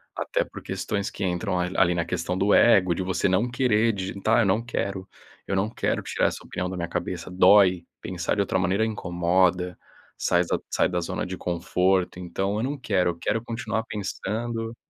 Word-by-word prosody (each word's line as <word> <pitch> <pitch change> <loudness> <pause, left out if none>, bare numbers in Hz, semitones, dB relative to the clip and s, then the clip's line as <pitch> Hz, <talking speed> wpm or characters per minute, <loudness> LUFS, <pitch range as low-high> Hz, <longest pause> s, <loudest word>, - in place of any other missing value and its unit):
até - - -1
por - - -10
questões 100 -1 -3
que 100 - -4
entram 90 0 -1
ali 90 0 +2
na 85 -1 -1
questão 90 +2 -2
do 100 +2 +3
ego, 95 -6 +5
de 95 - -2
você 95 +1 0
não 100 +7 +1
querer 115 -3 +2
digitar, 100 +3 0
eu 110 - +3
não 105 +5 +1
quero, 100 -5 -3 0.4
eu - - -3
não 100 +3 +1
quero - - -1
tirar - - 0
essa - - -4
opinião 90 0 -3
da 95 - -5
minha 85 -1 -2
cabeça. - - -4
Dói, 95 -1 +5
pensar 90 0 -2
de 100 - +1
outra 95 - 0
maneira 95 +4 +1
incomoda, 90 -2 +1 0.4
sai 90 0 +2
da - - 0
z - - -6
sai - - +3
da 90 -1 -1
zona 85 - -3
de 95 +1 -5
conforto, 90 +1 0
então 95 +3 -2
eu 110 - -1
não 140 +2 -2
quero, 95 -7 +1
eu 85 - -4
quero 115 +5 -1
continuar 115 -1 -3
pensando 115 +3 -4
95 Hz, 195 wpm, -25 LUFS, 90-110 Hz, 0.4 s, ego